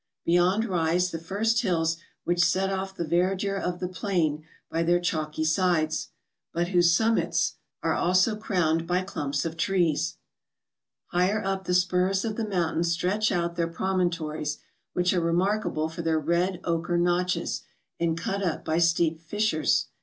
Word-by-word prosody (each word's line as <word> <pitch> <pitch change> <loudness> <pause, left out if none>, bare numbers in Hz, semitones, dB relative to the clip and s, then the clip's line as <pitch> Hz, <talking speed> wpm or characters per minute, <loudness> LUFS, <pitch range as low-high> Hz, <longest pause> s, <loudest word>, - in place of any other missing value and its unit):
Beyond 180 +6 +3
rise 180 -2 +1
tlie 165 - -5
first 215 +6 +1
hills 165 -3 +1 0.3
which 175 0 +2
set 190 +2 +2
off 190 0 -3
the 170 - -3
verdure 185 +4 +1
of 180 0 -2
the 180 - -2
plain 170 -5 -1 0.2
by 165 - -1
their 175 +1 +3
chalky 155 -3 -2
sides; 155 -1 +1 0.4
but 175 +1 -1
whose 175 -2 +4
summits 225 0 +1 0.3
are - - +2
also 185 +5 +3
crowned 170 -6 0
by 180 +1 +1
clumps 145 -6 -3
of 165 0 -4
trees. 170 -4 +1 0.9
Higher 185 +4 +1
up 195 0 -2
the 180 - +1
spurs 185 +2 +2
of 220 -2 -2
the 225 -1 -2
mountains 170 -3 0
stretch 190 +6 +1
out 170 -1 -1
their 170 -1 +1
promontories, 165 -4 -1 0.4
which 180 +1 +2
are 180 - +1
remarkable 170 -1 0
for 160 +1 -6
their 160 -1 +1
red 170 +4 0
ochre 170 0 0
notches, 175 0 0 0.4
and 165 -1 0
cut 195 +4 -2
up 175 -5 -2
by 160 +1 +1
steep 165 -1 +2
fissures. 170 -1 +1
175 Hz, 155 wpm, -26 LUFS, 165-190 Hz, 0.9 s, whose